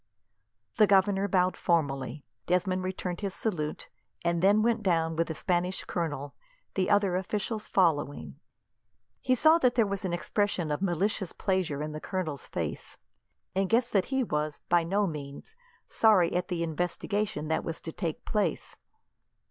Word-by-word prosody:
The 215 -2 +6
governor 195 0 +3
bowed 185 -1 +2
formally. 140 -4 0 0.2
Desmond 185 +1 +1
returned 185 -1 -4
his 195 -2 -3
salute, 155 -9 -3 0.4
and 170 0 +1
then 205 +3 +5
went 230 -1 +2
down 165 -4 +1
with 165 +1 +1
the 160 - -4
Spanish 180 +2 -1
colonel, 145 -5 -3 0.4
the 190 0 0
other 200 -3 +3
officials 210 +3 -3
following. 145 - 0 0.8
He 255 - +2
saw 315 +6 +5
that 250 -5 +3
there 230 - +4
was 200 -2 -3
an 185 - -1
expression 175 -2 -1
of 150 - -2
malicious 195 +1 0
pleasure 180 -7 -1
in 155 - -4
the 155 0 -6
colonel's 160 -8 -4
face, - - -5 0.6
and 190 0 0
guessed 240 +2 +2
that 195 -3 +3
he 265 -1 0
was, 150 -6 -2
by 175 -1 +4
no 200 +5 +1
means, 150 - -7 0.3
sorry 205 -6 +4
at 180 0 0
the 170 -2 -2
investigation 180 +2 -2
that 160 - 0
was 165 - -4
to 160 - -6
take 165 -2 -4
place. 210 -1 -1
180 Hz, 155 wpm, -29 LUFS, 160-200 Hz, 0.8 s, The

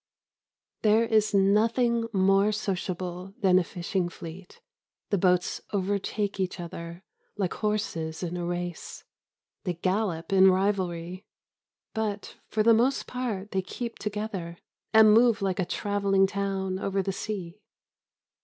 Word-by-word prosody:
There 220 +1 +4
is 215 -1 +2
nothing 230 +4 +3
more 195 +1 +3
sociable 185 -2 -4
than 185 -2 +5
a - - +1
fishing 175 0 -2
fleet. 175 +2 -10 0.5
The 200 - +2
boats 180 -1 +2
overtake 200 +1 -1
each 185 0 -2
other, 170 +1 -7 0.3
like 190 -4 -1
horses 190 -7 -2
in 175 0 -3
a 175 - -3
race. 175 0 -5 0.6
They 180 -3 -2
gallop 185 -1 -1
in 190 0 +7
rivalry. 185 -2 -1 0.7
But 215 -2 -3
for 215 - 0
the 230 +1 +6
most 250 +5 +2
part 220 -6 -4
they 190 - 0
keep 230 +5 -6
together, 205 -5 -4 0.3
and 220 -1 +7
move 230 0 +5
like 195 -2 -1
a 185 - +1
travelling 200 0 +1
town 195 -1 -2
over 195 0 -1
the 195 - -2
sea. 195 -2 -5
195 Hz, 130 wpm, -27 LUFS, 180-210 Hz, 0.7 s, in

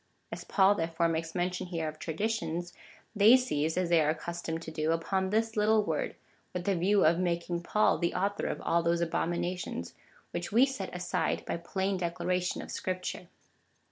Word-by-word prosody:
As - - -6
Paul, 195 0 +4
therefore, 165 -2 0
makes 165 0 -2
mention 180 +1 -1
here 165 -3 -2
of 155 0 -7
traditions, 175 -1 -2 0.4
they 215 +5 +8
seize, 160 - -1
as 180 -2 0
tliey 165 -2 +5
are 150 - +2
accustomed 165 +1 -3
to 160 - -7
do, 155 0 -1
uj)on 190 +4 0
this 225 +2 0
little 215 0 +3
word, - - -2 0.4
with 180 - -3
the 200 - +2
view 195 +3 +3
of 165 +2 +4
making 170 -1 -1
Paul 210 +4 +2
the 170 - 0
author 200 +2 0
of - - -3
all 170 +1 +2
those 170 0 +1
abomina 175 +2 -1
tions, 85 - -5 0.4
whicli 175 - -3
we 235 +5 +6
set 265 -9 -4
aside 180 -2 -1
by - - -2
plain 190 +3 -2
declaration 180 +1 -1
of - - -9
Scripture. 185 -1 -4
175 Hz, 180 wpm, -30 LUFS, 165-195 Hz, 0.4 s, they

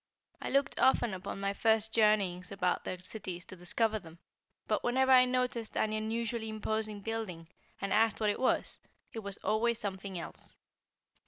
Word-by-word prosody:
I - - -3
looked 275 0 +1
often 240 -4 +4
upon 185 +1 -5
my 200 0 0
first 220 +1 +2
journeyings 200 -5 +2
about 180 -2 0
their 180 -1 -5
cities 180 -3 -5
to - - -10
discover 215 +5 0
them, 165 -3 -13 0.5
but - - 0
whenever 260 +2 +3
I 255 -1 +8
noticed 250 -3 -1
an 215 - +1
unusually 220 +1 -2
imposing 215 -1 -2
building, 195 -7 -4 0.3
and 195 -1 -1
asked 225 0 +3
what 210 -1 +2
it - - -4
was, 260 - 0 0.3
it 225 - -4
was 200 -2 -2
always 230 +2 +2
something 195 -2 -5
else. 170 - -7
215 Hz, 165 wpm, -32 LUFS, 195-230 Hz, 0.5 s, I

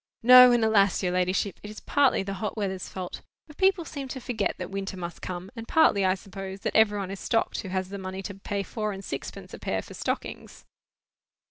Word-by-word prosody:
"No, 250 +1 +10
and 240 -2 +3
alas! 200 -3 +3
your 180 - +1
ladyship. 185 +2 0
It 210 - -8
is 215 - -9
partly 280 -8 +2
the 195 0 -4
hot 215 0 -3
weather's 190 -3 -3
fault, 185 -2 -6 0.2
for 300 - -14
people 380 +1 +2
seem 280 -4 -6
to 260 +1 -6
forget 235 -4 -2
that 180 0 -6
winter 195 0 -4
must 175 -1 -6
come; 185 +2 -6
and 230 -1 -7
partly, 315 -11 +4
I 185 0 +3
suppose, 195 0 -8
that - - -3
every 220 -2 +5
one 195 -2 -4
is 195 - -6
stocked 225 -2 0
who - - -8
has 185 0 -2
the 200 0 -6
money 190 0 -6
to 200 - -5
pay 200 +1 -4
four 215 +1 -3
and 195 0 -8
sixpence - - -7
a - - -8
pair - - -2
for - - -12
stockings." - - -5
200 Hz, 225 wpm, -27 LUFS, 190-225 Hz, 0.2 s, No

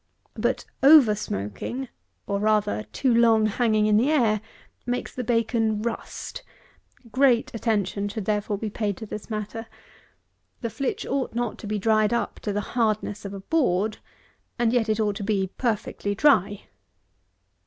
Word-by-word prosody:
But - - -1 0.2
over 275 -6 +8
smoking, 210 - -4 0.4
or, 200 0 -1
rather, 215 0 +1
too 260 -3 +1
long 230 -2 +5
hanging 215 0 +2
in 210 0 +4
the 250 +6 +3
air, 230 -9 +2 0.4
makes 245 0 -3
the 250 - -4
bacon 225 -2 +1
rust. 235 -1 -5 0.7
Great 255 -2 +3
attention 205 -3 -1
should, 210 -1 -5
therefore, 210 -1 -1
be 215 +1 -4
paid 205 -2 -2
to 220 - -7
this 210 +1 -7
matter. 220 +1 -5 0.9
The 230 - -3
flitch 255 +5 -3
ought 265 -4 -2
not 240 -3 -3
be 210 +1 -1
dried 215 +1 +2
up 235 - -2
to 210 - -3
the 205 +1 -1
hardness 215 -3 0
of 200 - -5
a 195 - -7
board, 215 - +1 0.6
and 235 -1 +2
yet 230 -3 +2
it 215 0 +1
ought 205 -2 0
to - - -5
be 195 -2 0
perfectly 210 -3 -1
dry. 205 -6 +3
215 Hz, 155 wpm, -25 LUFS, 205-235 Hz, 0.9 s, over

